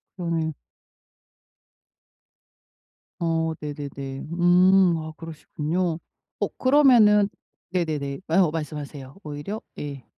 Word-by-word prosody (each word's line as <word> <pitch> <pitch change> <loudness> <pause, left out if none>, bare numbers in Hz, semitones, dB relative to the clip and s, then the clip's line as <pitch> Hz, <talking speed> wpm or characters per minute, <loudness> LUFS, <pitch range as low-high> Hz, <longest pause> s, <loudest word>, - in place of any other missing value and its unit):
그러네 165 -3 -1 2.7
어 165 -1 0
네네네. 140 -2 -6
음 180 +1 +5
어 155 0 -6
그러시군요. 165 +1 -3 0.4
어 - - 0
그러면은 240 -7 +5 0.4
네네네 155 -6 -2
예 - - +1
어 180 -5 +5
말씀하세요. 150 -3 -6
오히려 150 +8 -6 0.2
예. 140 -4 -6
165 Hz, 195 characters per minute, -24 LUFS, 150-180 Hz, 2.7 s, 음